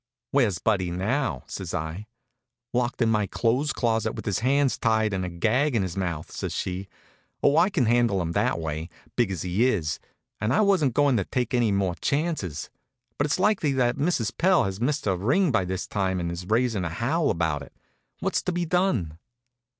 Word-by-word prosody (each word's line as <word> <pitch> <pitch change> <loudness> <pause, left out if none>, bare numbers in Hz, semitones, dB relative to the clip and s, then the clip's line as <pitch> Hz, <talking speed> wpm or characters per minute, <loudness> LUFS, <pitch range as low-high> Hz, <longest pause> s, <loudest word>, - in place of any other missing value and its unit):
"Where's 120 -10 +2
Buddy 95 -2 0
now?" 95 - -1
says - - -5
I. 80 +7 -4 0.7
"Locked 125 0 0
in 115 - +2
my 105 -2 +1
clothes 125 +9 +1
closet, 115 -2 0
with - - -7
his 100 -4 0
hands 135 +3 +2
tied 110 -2 +2
and 95 -1 -1
a 90 - -3
gag 115 - +1
in 105 - +2
his 90 -3 -4
mouth," 85 -5 -3
says - - -4
she. 95 +2 -3 0.6
"Oh, 145 - +5
I 175 - +5
can 155 -11 +1
handle 115 -3 +3
him 85 -2 -2
that - - +1
way, 80 +1 -4 0.3
big 120 -4 +2
as 95 -5 -3
he 95 +7 +2
is; 80 - -1 0.4
and 105 +2 0
I - - +4
wasn't 185 - +3
going 145 -4 +4
to 100 - 0
take 125 0 -2
any 120 -3 +3
more 100 -2 +1
chances. 140 - -1 0.5
But 145 - +3
it's 150 - 0
likely 185 -8 +2
that 125 -2 +2
Mrs. 140 - 0
Pell 185 +1 +4
has 95 +2 -4
missed 145 +4 0
her 95 -3 +2
ring 135 - +2
by 95 -6 +2
this 95 +1 -3
time 95 -2 -1
and 85 -1 -2
is 85 +1 -6
raising 115 -2 +1
a 85 - -2
howl 135 - 0
about 80 -4 0
it. - - -12 0.5
What's - - 0
to - - -2
be 175 0 -1
done?" 140 - 0
110 Hz, 200 wpm, -26 LUFS, 90-140 Hz, 0.7 s, Oh